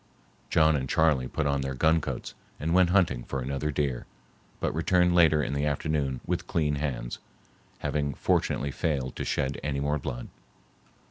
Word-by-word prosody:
John 80 Hz, -1 st, +4 dB
and 65 Hz, -2 st, -2 dB
Charley 80 Hz, -6 st, +3 dB
put 80 Hz, -, -2 dB
on 70 Hz, -1 st, +1 dB
their 65 Hz, 0 st, -3 dB
gun 80 Hz, +4 st, +3 dB
coats -, -, -5 dB, 0.3 s
and 80 Hz, +3 st, -1 dB
went 90 Hz, -1 st, +5 dB
hunting 85 Hz, -10 st, +2 dB
for 70 Hz, -, -4 dB
another 70 Hz, +3 st, -2 dB
deer, 70 Hz, -4 st, -2 dB, 0.5 s
but -, -, -1 dB
returned 90 Hz, +2 st, +3 dB
later 80 Hz, -3 st, +5 dB
in -, -, -2 dB
the 70 Hz, +1 st, 0 dB
afternoon 70 Hz, -3 st, -1 dB
with -, -, -2 dB
clean 75 Hz, -3 st, 0 dB
hands, 65 Hz, -5 st, -3 dB, 0.6 s
having 70 Hz, -2 st, -2 dB
fortunately 70 Hz, +1 st, 0 dB
failed 65 Hz, -3 st, -2 dB
to -, -, -2 dB
shed 70 Hz, +1 st, -1 dB
any 70 Hz, -1 st, -1 dB
more 70 Hz, +1 st, 0 dB
blood. -, -, -5 dB
75 Hz, 165 wpm, -28 LUFS, 65-80 Hz, 0.6 s, went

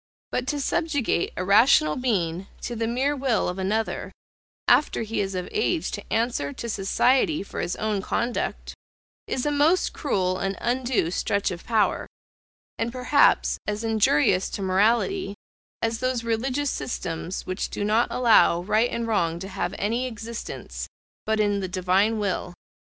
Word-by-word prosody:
But 250 Hz, 0 st, -2 dB
to 290 Hz, +2 st, -1 dB
subjugate 285 Hz, -, 0 dB
a 185 Hz, -, -1 dB
rational 200 Hz, -, +5 dB
being 190 Hz, -7 st, -1 dB
to 240 Hz, -, -4 dB
the 225 Hz, 0 st, -1 dB
mere 265 Hz, +5 st, 0 dB
will 260 Hz, -5 st, +1 dB
of 180 Hz, +2 st, -3 dB
another, 215 Hz, +4 st, -1 dB, 0.6 s
after 295 Hz, -, +3 dB
he 225 Hz, 0 st, -2 dB
is 195 Hz, -1 st, -3 dB
of 180 Hz, -1 st, -3 dB
age 360 Hz, -6 st, 0 dB
to 205 Hz, -, -7 dB
answer 225 Hz, -, 0 dB
to 235 Hz, -, -6 dB
society 245 Hz, +8 st, +2 dB
for -, -, -7 dB
his 175 Hz, -, -2 dB
own 215 Hz, -2 st, -1 dB
conduct, 235 Hz, +4 st, -2 dB, 0.5 s
is 255 Hz, -, -2 dB
a 295 Hz, -, +1 dB
most 300 Hz, +5 st, +2 dB
cruel 185 Hz, -, 0 dB
and 195 Hz, -1 st, -2 dB
undue 245 Hz, -8 st, 0 dB
stretch 200 Hz, +2 st, 0 dB
of 175 Hz, -1 st, -8 dB
power; 220 Hz, -3 st, +1 dB, 0.7 s
and 230 Hz, +1 st, -1 dB
perhaps 255 Hz, +3 st, +3 dB
as 210 Hz, +1 st, -2 dB
injurious 205 Hz, -5 st, +3 dB
to 200 Hz, -, -4 dB
morality, 215 Hz, -, +1 dB, 0.5 s
as 225 Hz, 0 st, 0 dB
those 255 Hz, -2 st, -1 dB
religious 255 Hz, +5 st, -1 dB
systems 175 Hz, -4 st, -4 dB
which 185 Hz, -, -3 dB
do -, -, -4 dB
not 215 Hz, +3 st, +2 dB
allow 220 Hz, -8 st, +4 dB
right 220 Hz, +5 st, +2 dB
and 235 Hz, -, -2 dB
wrong 170 Hz, -7 st, 0 dB
to 190 Hz, +3 st, -6 dB
have -, -, -3 dB
any 230 Hz, +5 st, -1 dB
existence, 230 Hz, -1 st, -6 dB, 0.4 s
but 220 Hz, 0 st, +1 dB
in 205 Hz, -1 st, +2 dB
the 190 Hz, -, -3 dB
Divine 185 Hz, +4 st, +1 dB
will. 190 Hz, -3 st, -2 dB
220 Hz, 155 wpm, -25 LUFS, 190-250 Hz, 0.7 s, rational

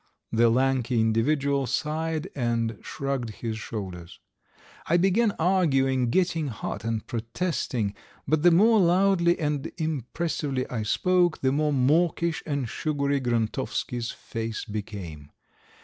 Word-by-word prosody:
The 115 Hz, +1 st, +4 dB
lanky 125 Hz, -1 st, +1 dB
individual 135 Hz, +5 st, +1 dB
sighed 160 Hz, +3 st, -2 dB
and 115 Hz, -4 st, -1 dB
shrugged 135 Hz, -4 st, -3 dB, 0.2 s
his 110 Hz, -1 st, -2 dB
shoulders. 95 Hz, -7 st, -7 dB, 0.7 s
I 170 Hz, -, +4 dB
began 195 Hz, +6 st, +3 dB
arguing, 135 Hz, -8 st, +2 dB
getting 165 Hz, +1 st, +1 dB
hot 115 Hz, -, -5 dB
and 115 Hz, -1 st, -2 dB
protesting, 115 Hz, -, -2 dB, 0.3 s
but 155 Hz, -1 st, +2 dB
the 175 Hz, -, +7 dB
more 215 Hz, +6 st, +5 dB
loudly 180 Hz, -1 st, +3 dB
and 150 Hz, -1 st, -2 dB
impressively 150 Hz, -2 st, -2 dB
I 120 Hz, -3 st, -2 dB
spoke 175 Hz, -, +2 dB
the 130 Hz, -, +2 dB
more 150 Hz, +2 st, +1 dB
mawkish 160 Hz, +5 st, +2 dB
and 140 Hz, -5 st, -1 dB
sugary 140 Hz, +2 st, -1 dB
Grontovsky's 120 Hz, 0 st, -1 dB
face 115 Hz, -1 st, -5 dB
became. 100 Hz, -9 st, -7 dB
135 Hz, 115 wpm, -26 LUFS, 115-165 Hz, 0.7 s, the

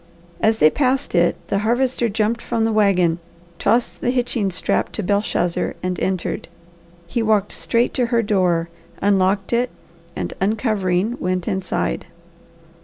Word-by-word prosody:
As 220 Hz, 0 st, +3 dB
they 155 Hz, -7 st, +5 dB
passed 265 Hz, -1 st, 0 dB
it, 175 Hz, -1 st, +3 dB
the 200 Hz, -, +1 dB
Harvester 240 Hz, +2 st, +1 dB
jumped 220 Hz, +2 st, 0 dB
from 225 Hz, -1 st, 0 dB
the 225 Hz, -, +1 dB
wagon, 180 Hz, -5 st, +3 dB, 0.4 s
tossed 235 Hz, +1 st, +1 dB
the -, -, 0 dB
hitching 245 Hz, -5 st, 0 dB
strap 185 Hz, -, 0 dB
to 215 Hz, -, -3 dB
Belshazzar, 200 Hz, -3 st, 0 dB
and 180 Hz, 0 st, -2 dB
entered. 185 Hz, -2 st, -2 dB, 0.6 s
He 200 Hz, +7 st, -2 dB
walked 215 Hz, -2 st, +2 dB
straight 235 Hz, +1 st, 0 dB
to 245 Hz, -2 st, +1 dB
her 230 Hz, 0 st, +2 dB
door, 180 Hz, -5 st, +1 dB, 0.3 s
unlocked 195 Hz, +1 st, +2 dB
it, 240 Hz, +1 st, +2 dB, 0.5 s
and -, -, -3 dB
uncovering, 210 Hz, 0 st, 0 dB
went 180 Hz, 0 st, -1 dB
inside. 190 Hz, -1 st, -2 dB
205 Hz, 140 wpm, -21 LUFS, 185-235 Hz, 0.6 s, they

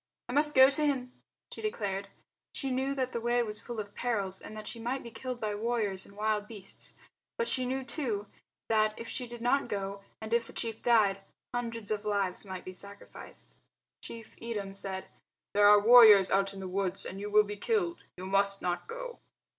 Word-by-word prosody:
"I 245 Hz, -, -5 dB
must 295 Hz, +2 st, +3 dB
go 265 Hz, +1 st, +9 dB
to 305 Hz, +2 st, +2 dB
him," 260 Hz, -4 st, 0 dB, 0.4 s
she -, -, -8 dB
declared. 200 Hz, -, -2 dB, 0.5 s
She 270 Hz, -2 st, -2 dB
knew 265 Hz, +2 st, 0 dB
that 260 Hz, -2 st, -1 dB
the 235 Hz, -, -3 dB
way 240 Hz, +1 st, +2 dB
was 210 Hz, -2 st, -2 dB
full 240 Hz, -2 st, -6 dB
of 205 Hz, -1 st, -6 dB
perils, 200 Hz, -6 st, -1 dB
and 215 Hz, -, -9 dB
that 215 Hz, -, -7 dB
she 235 Hz, -, -5 dB
might 250 Hz, +4 st, -2 dB
be 235 Hz, -, -9 dB
killed 250 Hz, +2 st, -5 dB
by 215 Hz, -2 st, -2 dB
warriors 210 Hz, -3 st, -1 dB
and 200 Hz, -, -17 dB
wild 210 Hz, -1 st, 0 dB
beasts; 205 Hz, -4 st, -8 dB, 0.4 s
but 470 Hz, -1 st, 0 dB
she 255 Hz, -1 st, 0 dB
knew 265 Hz, +1 st, -1 dB
too 240 Hz, -6 st, -2 dB, 0.4 s
that, 215 Hz, -1 st, +2 dB
if 230 Hz, -, -6 dB
she 250 Hz, +2 st, -4 dB
did 240 Hz, 0 st, -8 dB
not 255 Hz, +4 st, +2 dB
go 200 Hz, 0 st, -3 dB, 0.2 s
and 220 Hz, +1 st, -5 dB
if 235 Hz, -1 st, +2 dB
the -, -, -11 dB
chief 225 Hz, -1 st, -3 dB
died, 210 Hz, -5 st, +4 dB, 0.3 s
hundreds 230 Hz, -3 st, -3 dB
of 210 Hz, -1 st, -1 dB
lives 200 Hz, -2 st, -1 dB
might 190 Hz, -2 st, -7 dB
be 185 Hz, -, -7 dB
sacrificed. 200 Hz, +2 st, -11 dB, 0.4 s
Chief 225 Hz, -1 st, -10 dB
Edem 210 Hz, -4 st, -4 dB
said, 190 Hz, -1 st, -5 dB, 0.5 s
"There 205 Hz, 0 st, +6 dB
are 205 Hz, 0 st, +8 dB
warriors 215 Hz, -3 st, +8 dB
out 195 Hz, 0 st, +3 dB
in 195 Hz, -1 st, -8 dB
the 190 Hz, -, -4 dB
woods 190 Hz, 0 st, -1 dB
and 190 Hz, -, -6 dB
you 205 Hz, +1 st, -4 dB
will 210 Hz, 0 st, +6 dB
be 205 Hz, 0 st, -5 dB
killed. 355 Hz, -, -1 dB
You 185 Hz, -, -6 dB
must 195 Hz, +1 st, +2 dB
not 175 Hz, -1 st, -2 dB
go." -, -, -7 dB
215 Hz, 205 wpm, -31 LUFS, 200-245 Hz, 0.5 s, go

